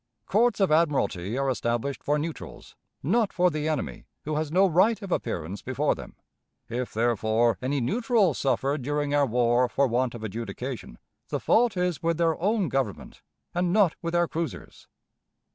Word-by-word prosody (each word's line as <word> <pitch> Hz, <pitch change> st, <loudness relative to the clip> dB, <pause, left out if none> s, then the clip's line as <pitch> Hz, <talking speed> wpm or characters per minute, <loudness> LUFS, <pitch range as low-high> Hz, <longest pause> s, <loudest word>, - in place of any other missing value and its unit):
Courts 230 Hz, +3 st, +2 dB
of 195 Hz, -5 st, +3 dB
admiralty 135 Hz, -, +1 dB
are 135 Hz, 0 st, 0 dB
established 125 Hz, +1 st, -1 dB
for 145 Hz, +1 st, +1 dB
neutrals; 155 Hz, +2 st, -7 dB, 0.3 s
not 215 Hz, -, +2 dB
for 180 Hz, 0 st, +2 dB
the 155 Hz, 0 st, -2 dB
enemy, 155 Hz, -, -3 dB, 0.2 s
who 155 Hz, 0 st, -2 dB
has 155 Hz, 0 st, -2 dB
no 190 Hz, +4 st, +5 dB
right 190 Hz, +6 st, +3 dB
of 195 Hz, -, -7 dB
appearance 90 Hz, -, -3 dB
before -, -, 0 dB
them. -, -, -10 dB, 0.5 s
If, 120 Hz, +1 st, -3 dB
therefore, 115 Hz, -1 st, +1 dB
any 135 Hz, +2 st, 0 dB
neutrals 215 Hz, -, +1 dB
suffered 135 Hz, +1 st, 0 dB
during 145 Hz, +2 st, -1 dB
our 145 Hz, -1 st, +3 dB
war 120 Hz, +1 st, +2 dB
for 140 Hz, +4 st, +2 dB
want 125 Hz, 0 st, 0 dB
of 115 Hz, -, -8 dB
adjudication, 115 Hz, -, -6 dB, 0.3 s
the -, -, -1 dB
fault 230 Hz, -4 st, +2 dB
is 180 Hz, -5 st, 0 dB
with 165 Hz, -1 st, 0 dB
their 165 Hz, -1 st, +2 dB
own 205 Hz, 0 st, +1 dB
Government, 135 Hz, -8 st, -3 dB, 0.3 s
and 175 Hz, 0 st, 0 dB
not 195 Hz, -4 st, +4 dB
with 170 Hz, 0 st, -3 dB
our 175 Hz, 0 st, +3 dB
cruisers. 165 Hz, 0 st, -6 dB
145 Hz, 165 wpm, -26 LUFS, 120-175 Hz, 0.5 s, no